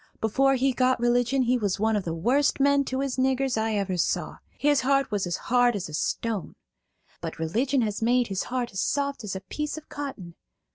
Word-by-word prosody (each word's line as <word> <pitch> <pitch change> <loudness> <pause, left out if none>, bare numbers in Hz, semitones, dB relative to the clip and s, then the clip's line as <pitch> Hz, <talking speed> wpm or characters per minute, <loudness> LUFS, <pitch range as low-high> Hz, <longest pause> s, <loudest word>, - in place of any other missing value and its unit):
Before 270 +5 +2
he 265 +1 +1
got 255 0 +2
religion 245 +2 +2
he 250 +1 +2
was 205 -3 -1
one 220 +1 +2
of 205 - -1
the 165 - -2
worst 255 - +2
men 280 0 +4
to 260 +1 -2
his 275 -2 -2
niggers 265 0 +1
I 220 0 0
ever 195 -3 -1
saw; 170 - -1 0.2
his 290 -1 +3
heart 275 0 +1
was 200 -3 -1
as 175 - -2
hard 245 -1 +2
as 190 -4 -4
a - - -10
stone. 210 +5 -2 0.7
But - - -5
religion 240 - 0
has 210 -1 -2
made 245 +2 +3
his 195 -3 -3
heart 245 -1 -2
as 190 - -2
soft 280 -3 -1
as 200 -2 -4
a 190 - -5
piece 300 +11 -4
of 310 - -11
cotton. 265 -12 -6
245 Hz, 210 wpm, -26 LUFS, 205-270 Hz, 0.7 s, men